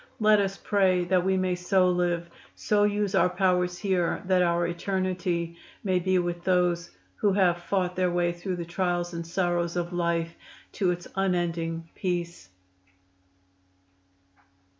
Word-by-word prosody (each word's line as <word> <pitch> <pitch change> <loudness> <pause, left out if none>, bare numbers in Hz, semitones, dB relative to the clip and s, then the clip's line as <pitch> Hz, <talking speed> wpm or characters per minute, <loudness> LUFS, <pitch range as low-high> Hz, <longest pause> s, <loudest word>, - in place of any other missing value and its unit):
Let 215 -1 +5
us 195 0 -2
pray 190 -3 +2
that 180 0 +2
we 190 0 +1
may 185 -1 +1
so 180 +1 +2
live, 175 -1 0 0.3
so 205 -1 +2
use 205 -1 0
our 180 -2 +4
powers 180 -1 +1
here 185 -4 0
that 185 -1 +3
our 170 -1 +2
eternity 175 -1 -2 0.3
may 185 -3 +1
be 185 +1 +1
with 175 -1 -2
those 180 -2 +1 0.3
who 205 -2 +2
have 180 -3 +3
fought 180 0 -1
their 185 -1 +1
way 175 0 +1
through 180 +2 -4
the 170 -1 -5
trials 175 0 -1
and 170 -1 -5
sorrows 175 -1 0
of 175 0 -2
life 170 -1 -1 0.4
to 190 -3 0
its 175 0 -3
unending 170 -3 -1
peace." 175 - -3
180 Hz, 145 wpm, -27 LUFS, 175-185 Hz, 0.4 s, Let